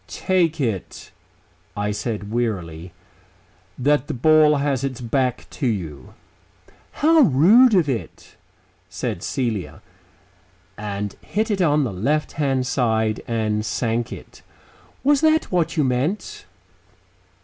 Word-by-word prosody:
"Take 170 -4 0
it," 110 -9 -4 0.7
I 105 0 -1
said 105 -1 -4
wearily, 90 -8 -3 0.9
"that 145 +1 +1
the - - -3
ball 155 +3 +5
has 140 -2 -1
its 135 -3 -3
back 125 +1 -1
to 135 - -2
you." 80 - -5 0.8
"How 320 +2 +3
rude 215 - +6
of 175 -5 +3
it," 125 -5 -5 0.5
said - - -4
Celia, 115 -8 -3 1.0
and 105 -1 -5
hit 220 +2 -2
it 195 -2 0
on 150 -3 +3
the 115 -7 -3
left 145 +12 -1
hand 135 -3 0
side, 110 -4 0
and 110 -2 -1
sank 115 +2 -2
it. - - -11 0.6
"Was 285 +1 +3
that 315 0 +2
what 170 -2 0
you 150 - +3
meant?" 135 +10 -2
130 Hz, 120 wpm, -22 LUFS, 110-155 Hz, 1.0 s, rude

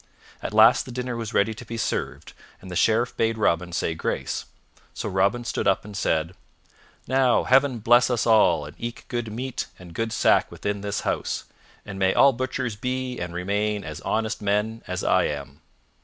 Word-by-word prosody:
At - - -4
last 110 +3 +6
the - - -7
dinner 125 0 -3
was 115 -2 -4
ready 105 +2 +3
to 110 - -10
be 115 - -6
served 110 - -3 0.3
and 95 - -11
the - - -5
Sheriff 115 +6 +2
bade 115 0 +1
Robin 90 -4 +1
say 85 - -1
grace, 80 - -3 0.5
so - - -4
Robin 100 +6 +1
stood - - -2
up 95 - +2
and 105 -1 -9
said, 80 -3 0 0.7
"Now 130 -1 +3
Heaven 130 0 +3
bless 120 +3 +4
us 120 -3 0
all 95 -9 +4
and 75 - -11
eke 120 0 -6
good 120 -3 -3
meat 125 +3 -4
and 90 -2 -12
good 115 +6 -2
sack - - +3
within 100 -1 -3
this 100 0 -2
house, - - -2 0.4
and 100 -2 -7
may 95 0 +2
all 140 0 +6
butchers 125 -2 -3
be 125 +3 -3
and 85 0 -4
remain 100 +4 -1
as 75 -2 -7
honest 110 0 -1
men 105 +2 0
as 90 0 -3
I - - +3
am." 70 0 -5
110 Hz, 185 wpm, -24 LUFS, 95-120 Hz, 0.7 s, last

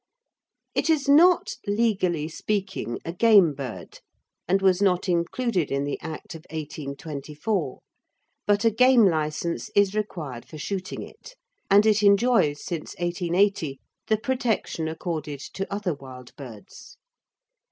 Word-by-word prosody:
It - - 0
is 300 -3 +2
not, 335 +6 +5
legally 195 -7 +1
speaking, 190 - -3
a 165 - -4
game 195 -5 +5
bird 135 -4 -8 0.5
and 190 +3 +3
was 190 -1 +3
not 185 -2 +2
included 180 - 0
in 140 0 0
the 145 - -3
Act 180 +5 -7
of 160 -1 -10
1824, 150 +2 -4 0.7
but 205 +1 +2
a 225 - +5
game 250 0 +5
licence 160 -1 -1
is 200 -1 +4
required 165 - -4
for 155 - -10
shooting 190 +4 -4
it, - - -13 0.3
and 205 +2 +6
it 215 -1 +4
enjoys 200 -7 +3
since 170 -4 -5
1880 175 -3 0 0.3
the 215 - +2
protection 230 - -1
accorded 160 -3 -4
to 195 +7 -6
other 200 -3 -1
wild 130 -3 -12
birds. 120 -7 -12
180 Hz, 130 wpm, -25 LUFS, 150-210 Hz, 0.7 s, and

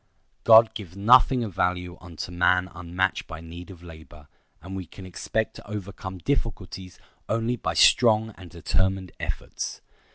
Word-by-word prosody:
God 110 0 +8
gives 95 -4 -9
nothing 125 +4 +5
of 105 -5 -5
value 90 0 -1
unto 85 -1 -7
man 90 +1 +2
unmatched 90 +1 -2
by 80 - -8
need 85 +2 -10
of 90 -3 -12
labor; 80 -3 -13 0.3
and 95 +4 -8
we 95 -3 -6
can 95 +4 -12
expect 110 +4 -3
to - - -13
overcome 95 -2 -6
difficulties 95 -5 -3 0.3
only 115 +2 0
by - - -3
strong 110 -2 +5
and 90 -2 -12
determined 95 +2 -1
efforts. - - -5
95 Hz, 150 wpm, -25 LUFS, 90-110 Hz, 0.3 s, God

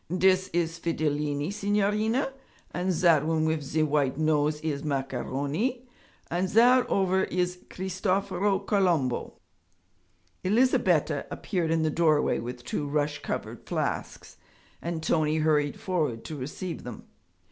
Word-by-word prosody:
'Dis 185 +1 +3
is 170 -1 -1
Fidilini, 150 0 -1
signorina, 210 +5 +1 0.4
and 180 +1 -1
zat 165 -4 +4
one 160 0 +1
wif 160 -1 0
ze 150 +3 0
white 140 -3 +1
nose 150 -1 +1
is 145 -3 -2
Macaroni, 145 - -2 0.4
and 180 +2 0
zat 245 +4 +5
ovver 190 -1 +2
is 180 0 -1
Cristoforo 190 +1 0
Colombo.' 180 - 0 1.1
Elizabetta 235 +7 +2
appeared 175 -6 -2
in 165 0 +2
the 155 - +1
doorway 155 -2 +2
with 120 +1 -6
two 145 +3 -2
rush 150 0 -1
covered - - -5
flasks, - - -3 0.4
and 165 -1 -4
Tony 155 -1 +2
hurried 150 -2 +1
forward 155 -11 -1
to 155 - -5
receive 150 +6 -5
them. 120 -3 -8
165 Hz, 125 wpm, -27 LUFS, 150-190 Hz, 1.1 s, zat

